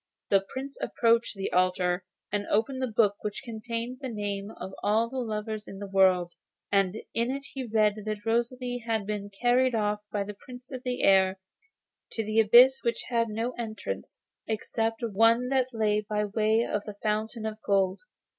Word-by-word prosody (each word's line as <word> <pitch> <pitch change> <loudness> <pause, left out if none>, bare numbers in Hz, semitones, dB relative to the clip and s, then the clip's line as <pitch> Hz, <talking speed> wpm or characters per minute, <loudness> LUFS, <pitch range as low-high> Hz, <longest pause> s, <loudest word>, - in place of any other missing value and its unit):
The 195 -1 +5
Prince 270 +1 -6
approached 230 -1 +2
the 195 0 -4
altar 180 0 +2 0.3
and 205 0 -1
opened 245 +5 0
the 260 - +1
book, 210 -3 +2
which 210 +5 -4
contained 235 +1 -5
the 265 - -4
names 205 -2 -3
of 190 - -7
all 220 +3 +2
the 265 - -3
lovers 215 -2 -4
in 195 - -8
the 200 - -6
world: 185 -3 +3 0.4
and 195 -1 +2 0.2
in 235 +1 0
it 275 +1 -3
he 265 -3 -4
read 215 -1 +2
that 215 0 -4
Rosalie 245 +2 -1
had 225 -3 -1
been 205 -1 -4
carried 245 +4 +2
off 210 -1 0
by 205 -1 0
the 210 +1 -7
Prince 250 +5 -13
of 255 -2 -5
the 250 -1 -3
Air 190 -1 +5 0.8
to 225 - -2
an 220 +1 +3
abyss 250 +5 +7
which 235 - -1
had 230 -2 +1
no 225 +3 -2
entrance 230 - -5 0.3
except 225 +1 -2
the 230 -2 -2
one 230 +4 +4
that 260 -2 +2
lay 215 -2 +1
by 210 0 0
way 220 +2 +2
of 205 - -2
the 210 - -7
Fountain 215 +1 -1
of 215 0 -4
Gold. 195 -1 +1
220 Hz, 185 wpm, -28 LUFS, 205-235 Hz, 0.8 s, abyss